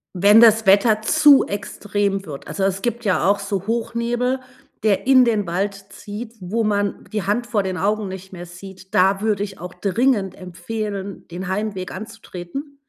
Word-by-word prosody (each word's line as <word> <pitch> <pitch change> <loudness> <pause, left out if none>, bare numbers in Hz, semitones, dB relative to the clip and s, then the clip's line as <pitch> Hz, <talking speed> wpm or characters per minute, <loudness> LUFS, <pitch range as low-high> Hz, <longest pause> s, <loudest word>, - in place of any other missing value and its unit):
Wenn 205 +5 +6
das 220 -2 +5
Wetter 210 +2 +5
zu 280 +5 +6
extrem 205 -1 -2
wird, 140 -3 -8
also 200 - -5
es 195 0 -1
gibt 235 0 -2
ja 195 -3 +1
auch 200 +1 +3
so 200 -2 -3
Hochnebel, 235 +3 -1 0.4
der 215 +2 +1
in 260 -2 +7
den 215 -5 0
Wald 195 +4 -1 0.2
zieht, 215 +3 -8
wo 205 +5 -2
man 205 -2 -1
die 210 -3 -2
Hand 235 +4 -1
vor 210 -4 0
den 185 -1 -3
Augen 205 +1 0
nicht 190 0 -9
mehr 175 -1 -8
sieht, 190 +2 -13
da 195 +2 +3
würde 210 -2 0
ich 200 -2 -5
auch 180 +1 -8
dringend 210 -1 0
empfehlen, 195 +2 -6
den 180 +2 -6
Heimweg 190 -1 -3
anzutreten. 215 - -8
205 Hz, 170 wpm, -21 LUFS, 190-225 Hz, 0.4 s, in